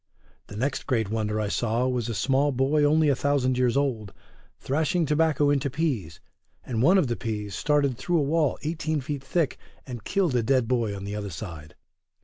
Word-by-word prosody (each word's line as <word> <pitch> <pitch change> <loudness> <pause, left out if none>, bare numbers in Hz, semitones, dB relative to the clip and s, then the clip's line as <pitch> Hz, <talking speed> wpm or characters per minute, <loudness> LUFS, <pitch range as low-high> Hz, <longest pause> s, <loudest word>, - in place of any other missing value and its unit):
The 100 - -9
next 130 +4 -2
great 110 -5 0
wonder 110 -1 -1
I 105 - -1
saw 120 +4 0
was 125 -2 -1
a 115 - -3
small 140 +5 +2
boy 135 +3 +2
only 155 +1 +4
a 140 - +3
thousand 130 -2 +1
years 125 0 +2
old, 120 -8 -1 0.4
thrashing 160 +4 0
tobacco 150 -1 +2
into 140 0 +1
peas, 130 - -2 0.5
and 115 -3 -2
one 175 +9 +5
of 185 - +3
the 120 -2 -1
peas 105 -4 -4
started 140 0 +1
through 175 -1 0
a 155 - +2
wall 150 -1 +1
eighteen 155 0 -1
feet 140 0 -5
thick, 160 +2 -1 0.3
and 120 -5 -7
killed 190 - 0
a 120 - +3
dead 125 0 +2
boy 115 -4 0
on 100 - -7
the 100 +1 -5
other 105 -1 -4
side. 80 -4 -8
130 Hz, 195 wpm, -26 LUFS, 110-145 Hz, 0.5 s, one